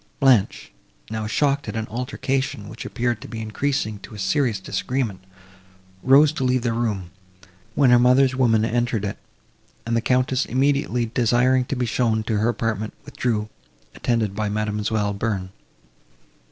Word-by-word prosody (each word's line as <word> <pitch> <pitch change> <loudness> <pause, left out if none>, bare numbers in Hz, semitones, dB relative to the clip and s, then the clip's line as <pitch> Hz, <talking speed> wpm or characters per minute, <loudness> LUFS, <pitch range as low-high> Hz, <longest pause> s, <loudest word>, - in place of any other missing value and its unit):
Blanche, 130 -7 +3 0.4
now 110 -1 -3
shocked 140 +5 +1
at - - -5
an 110 -1 -2
altercation, 125 -1 -3
which 110 - -8
appeared 120 -2 -2
to - - -8
be 115 - -6
increasing 110 -1 -2
to 105 - -11
a - - -9
serious 105 +3 0
disagreement, 105 +1 -3 0.8
rose 140 +3 +6
to 155 - -3
leave 125 -1 +1
the 120 -2 0
room, 105 -7 -2 0.6
when 135 -3 +4
her 120 - +7
mother's 130 +2 +4
woman 115 -4 +3
entered 120 -2 0
it; 100 - -4 0.7
and 115 0 -1
the 115 - +2
Countess, 130 +2 +1
immediately 135 -2 +1
desiring 125 +2 +2
to 135 - -3
be 125 -1 -1
shown 115 -2 0
to 110 -1 -1
her 110 +2 +1
own 120 - 0
apartment, 110 -2 -2
withdrew, 110 -4 -2 0.5
attended 110 -5 -1
by 105 0 -1
Mademoiselle 105 0 -1
Bearn. 100 -3 -3
115 Hz, 155 wpm, -23 LUFS, 110-130 Hz, 0.8 s, her